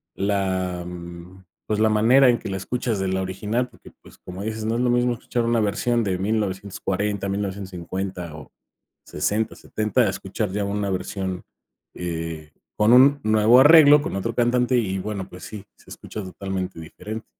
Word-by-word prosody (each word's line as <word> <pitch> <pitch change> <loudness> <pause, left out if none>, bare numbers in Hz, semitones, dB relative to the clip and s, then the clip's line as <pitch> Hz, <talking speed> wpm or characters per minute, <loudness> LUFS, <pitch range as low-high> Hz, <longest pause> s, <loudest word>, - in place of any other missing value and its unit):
la, 95 -3 -1
mm, 90 +1 -10 0.2
pues, 105 -1 -1
la 110 0 +4
manera 120 +5 +5
en 120 - +2
que - - -7
la 95 - -3
escuchas 120 +2 -2
de 95 - -1
la 95 0 -1
original, 105 +6 -2
porque, 120 - -17
pues, - - -17
como 90 +1 -9
dices, 110 0 -4
no 110 +1 0
es 120 - 0
lo 125 - +2
mismo 120 0 +2
escuchar 120 +1 -3
una 115 0 +2
versión 115 +3 0
de 95 -3 -1
1940, 100 0 -2
1950 95 -3 -4
o 75 - -12 0.5
60, 110 +2 -1
70, 110 +3 -1
a 110 - +3
escuchar 100 +1 -4
ya 100 +1 -1
una 100 0 -2
versión, 95 0 -3 0.5
eh, 80 -3 -5 0.3
con 105 +3 +4
un 140 +3 +6
nuevo 110 +3 +5
arreglo, 150 0 +8
con - - -4
otro 115 +4 -2
cantante, 125 +1 +2
y 95 -5 -1
bueno, 100 -1 -4
pues 90 - -12
sí, 105 -3 -9
se - - -20
escucha 105 - -7
totalmente 95 -1 -5
diferente. 110 +7 -8
100 Hz, 170 wpm, -23 LUFS, 95-115 Hz, 0.5 s, arreglo